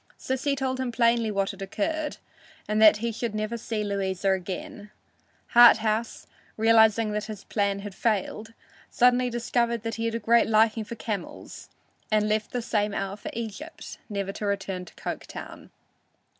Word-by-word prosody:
Sissy 270 +2 -1
told 260 -1 -2
him 260 -2 -2
plainly 235 -1 +2
what 195 -2 0
had - - -12
occurred, 300 +10 -2 0.5
and 215 +1 +1
that 215 -1 +8
he 230 +2 -2
should 225 -1 -4
never 215 +2 -2
see 225 -2 -3
Louisa 195 -1 -1
again. 190 +2 -4 0.6
Harthouse, 225 -1 +5 0.3
realizing 220 -1 +4
that 210 0 -2
his 215 -3 -8
plan 200 -2 -1
had 205 -1 -7
failed, 220 +1 -2 0.4
suddenly 250 0 +3
discovered 235 -1 -1
that 225 0 -3
he - - 0
had 230 0 -1
a - - -1
great 230 +2 +4
liking 220 0 +3
for 235 - -7
camels, 210 -5 -6 0.4
and 215 0 +3
left 215 0 0
the 245 -2 -3
same 210 -2 0
hour 195 0 -3
for 210 - -7
Egypt, 235 +8 -7
never 200 -2 -3
to 210 - -6
return 195 -2 -3
to - - -16
Coketown. - - -7
220 Hz, 160 wpm, -26 LUFS, 205-235 Hz, 0.6 s, that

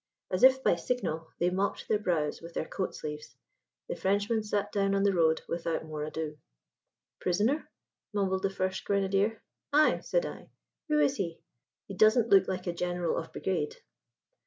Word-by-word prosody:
As 185 - 0
if 265 0 +7
by - - +4
signal 165 -7 -2
they 175 +1 +1
mopped 195 +2 -1
their 210 - +2
brows 165 -7 -1
with 170 0 -10
their - - -1
coat 190 - -3
sleeves. 150 0 -7 0.5
The - - -3
Frenchman 205 +4 +1
sat 205 -1 -1
down 195 -1 +1
on 195 - +2
the 200 -1 +3
road 160 -2 +3
without 165 -1 -2
more 155 -1 -5
ado. 155 0 -4 0.8
"Prisoner?" 215 - +1 0.4
mumbled 190 -2 0
the 195 - +1
first 190 -1 -2
grenadier. 200 +2 +1 0.3
"Ay," 300 +2 +4
said - - 0
I. - - -8 0.4
"Who 300 0 +3
is 280 -1 +3
he? 170 -5 -3 0.5
He 200 - -7
doesn't 215 +4 +4
look 195 -1 +6
like 185 -1 -3
a 175 - -1
general 175 0 -1
of 165 - -4
brigade." 170 -6 -2
190 Hz, 170 wpm, -30 LUFS, 170-205 Hz, 0.8 s, if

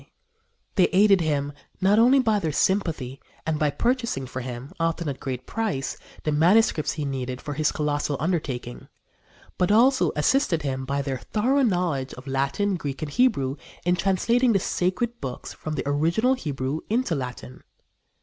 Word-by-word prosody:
They 185 - +6
aided 195 -1 +5
him 145 -3 -1 0.3
not 195 +3 +4
only 250 +4 +6
by 220 -5 +2
their 160 -5 -1
sympathy 150 -7 0 0.2
and 160 -1 -1
by 150 - +2
purchasing 235 - -1
for 130 0 -6
him, 125 +3 -7
often 165 0 -1
at 140 - -2
a - - -24
great 130 -1 -5
price, 210 -12 -2 0.3
the 155 - 0
manuscripts 165 +2 +3
he 150 -2 -3
needed 130 -2 -3
for 145 0 -5
his 150 +1 +1
colossal 145 -1 -1
undertaking, 140 -7 -3 0.7
but 180 +2 +2
also 230 - +4
assisted 165 - +2
him 130 -2 -2
by 140 +1 -1
their 135 -2 -3
thorough 255 - +1
knowledge 175 - 0
of 125 - -12
Latin, 140 +9 0
Greek 140 -2 -5
and 150 - -4
Hebrew 140 - +2 0.3
in 180 0 +3
translating 230 +7 +2
the 195 - +3
Sacred 190 +7 -1
Books 130 -2 -6
from 155 0 -5
the 135 - -2
original 165 - +2
Hebrew 145 - -3
into 230 -3 +1
Latin. 125 -2 -6
155 Hz, 165 wpm, -25 LUFS, 135-205 Hz, 0.7 s, They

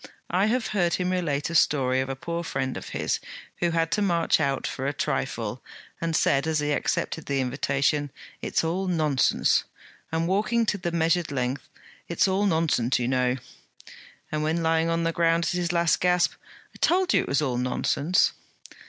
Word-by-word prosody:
I 185 +4 +3
have 240 +1 0
heard 175 -5 +1
him 180 0 -1
relate 165 -5 -1
a - - -4
story 130 -5 +3
of 130 - -4
a 135 - -2
poor 170 +5 -4
friend 130 -5 -2
of - - -7
his, - - -1 0.4
who 175 - +2
had 165 0 0
to 210 - +1
march 170 -6 +2
out 140 -3 0
for 135 +1 -3
a 140 - -1
trifle, - - -3 0.4
and 165 -1 -1
said, 140 0 +2
as 160 -1 +1
he 150 0 0
accepted 155 +2 -1
the 140 -1 0
invitation, 140 +2 0 0.3
"It's - - 0
all 180 +4 -1
nonsense!" 155 -6 +2 0.5
and 165 +1 0
walking 215 +5 +1
to 205 -2 -1
the 175 -1 -2
measured 165 0 +1
length, 130 0 -2 0.4
"It's 170 - +2
all 195 +2 +1
nonsense, 160 -8 +1
you 120 - -1
know!" 125 -1 +1 1.0
and 155 - -1
when 160 +2 0
lying 165 0 +2
on 165 0 0
the 165 - +1
ground, 170 0 +2
at - - 0
his 175 -1 -1
last 170 -2 +2
gasp, 180 -1 +2 0.4
"I - - -16
told 370 +1 +2
you - - +4
it - - -6
was 140 +2 +1
all 125 -4 -1
nonsense!"' 140 +6 +1
165 Hz, 190 wpm, -26 LUFS, 140-175 Hz, 1.0 s, you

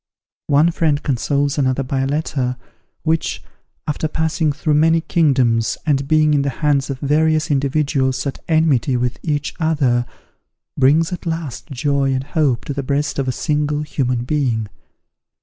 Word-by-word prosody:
One 150 +4 +4
friend 155 -3 0
consoles 140 +2 0
another 130 0 +1
by 135 +1 -2
a 135 - 0
letter, 135 -4 -1 0.5
which, 125 - -1 0.4
after 150 +1 -1
passing 160 0 0
through 150 +1 -1
many 160 +2 +4
kingdoms, 130 -9 +2
and 140 -3 +1
being 155 0 +3
in 145 - +3
the 140 - 0 0.2
hands 140 -2 +2
of 135 - -3
various 155 +2 +2
individuals 135 -1 0
at 140 - -4
enmity 150 -6 +2
with 125 +1 -2
each 145 -2 -2
other, 140 -7 +1 0.7
brings 155 +6 +3
at 175 - -6
last 160 -6 -4
joy 140 0 0
and 130 0 -1
hope 140 -4 0
to 145 - -3
the 140 - -3
breast 140 +2 -1
of 135 - -1
a - - +1
single 150 +1 -1
human 125 -5 -1
being. 125 -6 -1
145 Hz, 155 wpm, -19 LUFS, 130-155 Hz, 0.7 s, One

